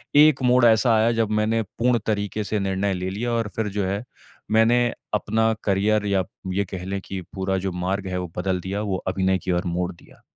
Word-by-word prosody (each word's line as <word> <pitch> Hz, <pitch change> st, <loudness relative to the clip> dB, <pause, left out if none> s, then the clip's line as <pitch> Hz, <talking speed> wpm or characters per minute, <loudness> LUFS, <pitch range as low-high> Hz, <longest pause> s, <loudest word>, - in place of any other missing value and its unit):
एक 150 Hz, -2 st, +6 dB
मोड़ 125 Hz, -1 st, +5 dB
ऐसा 115 Hz, +1 st, +5 dB
आया 110 Hz, +2 st, +3 dB
जब 115 Hz, -2 st, 0 dB
मैंने 115 Hz, +1 st, +1 dB, 0.2 s
पूर्ण 120 Hz, 0 st, +3 dB
तरीके 105 Hz, 0 st, -1 dB
से 105 Hz, +1 st, -1 dB
निर्णय 95 Hz, 0 st, 0 dB
ले 90 Hz, +1 st, -3 dB
लिया 115 Hz, +5 st, -2 dB
और 115 Hz, -2 st, 0 dB
फिर 110 Hz, -2 st, -1 dB
जो 100 Hz, -, +1 dB
है 100 Hz, +4 st, -2 dB, 0.5 s
मैंने 115 Hz, +2 st, +4 dB, 0.3 s
अपना 110 Hz, +2 st, +1 dB
करियर 105 Hz, +1 st, +2 dB
या 95 Hz, -2 st, +2 dB, 0.3 s
ये 100 Hz, +1 st, 0 dB
कह 90 Hz, -1 st, -5 dB
ले 100 Hz, +1 st, -3 dB
कि 95 Hz, -1 st, -6 dB
पूरा 95 Hz, 0 st, -1 dB
जो -, -, -1 dB
मार्ग 95 Hz, +2 st, -2 dB
है 90 Hz, 0 st, -2 dB
वो 90 Hz, -2 st, -4 dB
बदल 90 Hz, 0 st, 0 dB
दिया, 95 Hz, +3 st, -3 dB
वो 100 Hz, -3 st, -1 dB
अभिनय 95 Hz, 0 st, +1 dB
की 90 Hz, 0 st, -3 dB
ओर 90 Hz, +2 st, 0 dB
मोड़ 90 Hz, +1 st, -1 dB
दिया। -, -, -20 dB
100 Hz, 215 wpm, -23 LUFS, 95-110 Hz, 0.5 s, एक